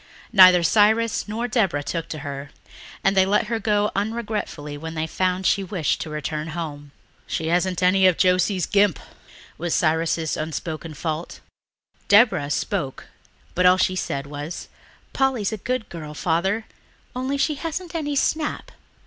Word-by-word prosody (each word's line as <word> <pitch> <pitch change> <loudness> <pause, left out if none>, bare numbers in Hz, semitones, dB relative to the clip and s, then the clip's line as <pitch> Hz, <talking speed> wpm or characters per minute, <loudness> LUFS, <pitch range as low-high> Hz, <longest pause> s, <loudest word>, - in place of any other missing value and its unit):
Yet - - -23
neither 185 -2 +9
Cyrus 220 +5 +3
nor 225 +3 -2
Deborah 195 - +1
took 165 +2 -4
to 155 - -5
her, 140 0 -6 0.5
and 195 +1 +3
they 190 - +6
let 200 +3 +2
her 225 +1 -2
go 210 -1 +1
unregretfully 210 -8 -3
when 160 +2 -7
they 160 0 -1
found 185 +3 -1
that - - +2
she 200 - +1
wished 180 -5 -1
to - - -5
return 150 +1 -4
home. 145 -3 -6 0.4
"She 160 - -2
hasn't 180 +1 +1
any 185 +1 +5
of 180 - +3
Josie's 185 0 +2
gimp," 200 -6 +3 0.6
was 170 -1 -1
old - - +3
Cyrus's 160 -1 +1
unspoken 155 0 -5
fault. 160 +3 -4 0.7
Deborah 205 -9 +5
spoke, 150 -2 -3 0.4
but 180 +1 +4
all 180 0 +6
she 185 0 +1
said 140 -6 -3
was, 145 +3 -7 0.4
"Polly's 260 -7 +1
a - - -3
good 250 +2 -3
girl, 155 -3 -8
Father, 190 +8 0 0.5
only 260 +2 -2
she 300 +2 +1
hasn't 330 +4 -5
any 295 -3 -2
snap." 305 +2 -1
185 Hz, 160 wpm, -23 LUFS, 160-215 Hz, 0.7 s, neither